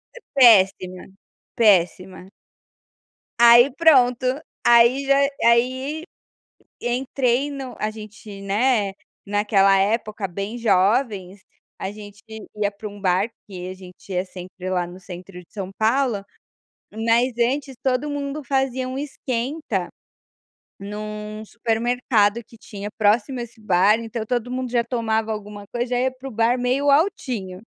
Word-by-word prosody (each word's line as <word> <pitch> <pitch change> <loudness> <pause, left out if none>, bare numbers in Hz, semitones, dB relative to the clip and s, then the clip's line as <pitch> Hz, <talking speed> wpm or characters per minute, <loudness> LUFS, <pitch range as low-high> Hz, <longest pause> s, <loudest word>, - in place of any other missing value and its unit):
E - - -10 0.2
péssima, 190 -7 +5 0.6
péssima. 185 -3 +2 1.1
Aí 240 +3 +8
pronto, 260 -7 +4 0.4
aí 240 +3 +5
já 275 0 +4 0.3
aí 260 +6 +2 0.8
entrei 255 +2 0
no 270 -3 -7
a 215 - -1
gente, 215 -2 -11
né, 205 0 +1 0.3
naquela 200 -1 +3
época 210 0 0
bem 200 +6 -5
jovens, 200 -2 +1 0.4
a 190 - -4
gente 205 -1 -12 0.3
ia 205 -1 0
para 205 +1 -8
um 205 0 -12
bar 190 +2 +1 0.2
que 180 -2 -7
a 185 - -6
gente 185 +1 -13
ia 180 +1 0
sempre 185 0 -8
lá 180 -1 0
no 180 +2 -11
centro 180 0 -10
de 175 - -18
São 195 -3 -5
Paulo, 225 -2 +1 0.7
mas 230 +3 +2
antes 265 +3 0
todo 265 +3 0
mundo 285 +1 -4
fazia 260 -1 -1
um 260 - -5
esquenta 260 - -3 0.9
num 210 +1 -6
supermercado 230 -1 0
que - - -17
tinha 205 -2 -8
próximo 220 +4 +1
a - - -3
esse 235 -1 -13
bar. 205 +2 +3
Então 225 -1 -5
todo 245 +1 -2
mundo 255 -1 -3
já 240 -1 +2
tomava 225 -2 -1
alguma 210 -1 -7
coisa, 240 +1 -1
já - - +1
ia 260 +1 +1
para 260 +1 -9
o - - -11
bar 230 +3 +1
meio 270 +3 +1
altinho. 240 - 0
225 Hz, 135 wpm, -22 LUFS, 200-250 Hz, 1.1 s, Aí